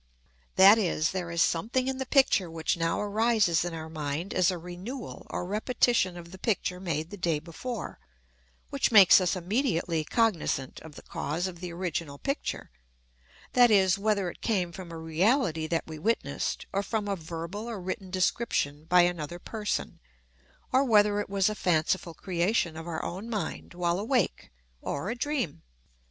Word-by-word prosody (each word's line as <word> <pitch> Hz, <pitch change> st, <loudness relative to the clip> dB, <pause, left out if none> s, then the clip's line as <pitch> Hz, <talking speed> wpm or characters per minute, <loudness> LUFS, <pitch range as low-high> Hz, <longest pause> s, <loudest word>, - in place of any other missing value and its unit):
That 200 Hz, +4 st, +8 dB
is, 170 Hz, -5 st, +1 dB
there 180 Hz, -2 st, -3 dB
is 170 Hz, 0 st, +2 dB
something 235 Hz, +10 st, 0 dB
in 265 Hz, 0 st, -2 dB
the 265 Hz, -, -3 dB
picture 255 Hz, -, +3 dB
which 160 Hz, -1 st, -1 dB
now 165 Hz, -1 st, 0 dB
arises 210 Hz, -5 st, +2 dB
in 175 Hz, -1 st, -4 dB
our 160 Hz, -1 st, -6 dB
mind 155 Hz, +2 st, -4 dB
as 185 Hz, 0 st, +3 dB
a 180 Hz, -, -1 dB
renewal 180 Hz, +10 st, -8 dB
or -, -, -3 dB
repetition 210 Hz, -2 st, +1 dB
of 170 Hz, 0 st, -10 dB
the 190 Hz, -, -11 dB
picture 180 Hz, -4 st, -1 dB
made 165 Hz, -3 st, -3 dB
the 205 Hz, -, -7 dB
day 170 Hz, -4 st, 0 dB
before, 175 Hz, +10 st, -6 dB, 0.7 s
which -, -, +1 dB
makes 200 Hz, -4 st, +8 dB
us 180 Hz, +1 st, +1 dB
immediately 180 Hz, -, 0 dB
cognizant 165 Hz, -, 0 dB
of 160 Hz, -2 st, -12 dB
the -, -, -11 dB
cause 155 Hz, +6 st, -3 dB
of 180 Hz, -2 st, -5 dB
the 180 Hz, -1 st, -6 dB
original 170 Hz, -4 st, -4 dB
picture 275 Hz, -, -3 dB, 0.8 s
that 245 Hz, -1 st, +6 dB
is, 195 Hz, -2 st, +4 dB
whether 200 Hz, -2 st, +1 dB
it -, -, -18 dB
came 185 Hz, -6 st, 0 dB
from 175 Hz, 0 st, -9 dB
a 165 Hz, -, -6 dB
reality 160 Hz, -, +1 dB
that 165 Hz, 0 st, -1 dB
we 160 Hz, -1 st, -8 dB
witnessed, 225 Hz, +8 st, -1 dB
or 200 Hz, -, +1 dB
from 210 Hz, 0 st, -2 dB
a 200 Hz, -, 0 dB
verbal 170 Hz, +6 st, -6 dB
or 225 Hz, -4 st, -5 dB
written 185 Hz, +1 st, -5 dB
description 180 Hz, -6 st, 0 dB
by 180 Hz, +2 st, +5 dB
another 175 Hz, -2 st, -1 dB
person, 210 Hz, +3 st, -4 dB, 0.7 s
or 260 Hz, +2 st, +5 dB
whether 210 Hz, -4 st, +4 dB
it 205 Hz, -, -4 dB
was 195 Hz, 0 st, +2 dB
a 215 Hz, -, 0 dB
fanciful 170 Hz, -2 st, 0 dB
creation 175 Hz, -1 st, 0 dB
of 160 Hz, +1 st, -7 dB
our 165 Hz, -2 st, -4 dB
own 195 Hz, +6 st, -5 dB
mind 205 Hz, -5 st, -4 dB
while 175 Hz, 0 st, 0 dB
awake, 240 Hz, +4 st, 0 dB, 0.3 s
or 175 Hz, +9 st, -3 dB
a -, -, -3 dB
dream. 250 Hz, -, -2 dB
185 Hz, 170 wpm, -28 LUFS, 165-215 Hz, 0.8 s, That